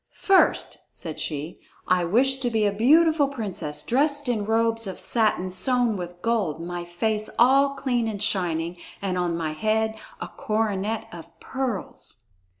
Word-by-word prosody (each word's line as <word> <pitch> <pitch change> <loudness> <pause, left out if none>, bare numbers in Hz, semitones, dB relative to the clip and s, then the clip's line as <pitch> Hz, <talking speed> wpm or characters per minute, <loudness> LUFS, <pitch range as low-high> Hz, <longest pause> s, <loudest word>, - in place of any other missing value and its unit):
"First," 390 -1 +3
said 160 -2 -7
she, 155 +1 -4 0.3
"I 180 -1 +3
wish 260 +9 +2
to 250 -2 0
be 220 -2 +1
a 205 - +3
beautiful 300 +7 +4
princess, 195 - -4
dressed 285 +2 +1
in 220 -4 0
robes 225 0 +1
of 190 - -5
satin 215 -5 +1
sewn 240 +4 +2
with 175 -1 -7
gold, 210 -10 0
my 175 +1 -5
face 210 +5 -2
all 275 +3 +5
clean 245 -4 0
and 215 -2 -3
shining, 175 -4 -1 0.2
and 190 -2 -2
on 175 -2 0
my 160 -2 -2
head 220 +6 0 0.3
a - - -5
coronet 215 0 -2
of 170 -1 -12
pearls." 240 - -4
215 Hz, 150 wpm, -25 LUFS, 175-245 Hz, 0.3 s, all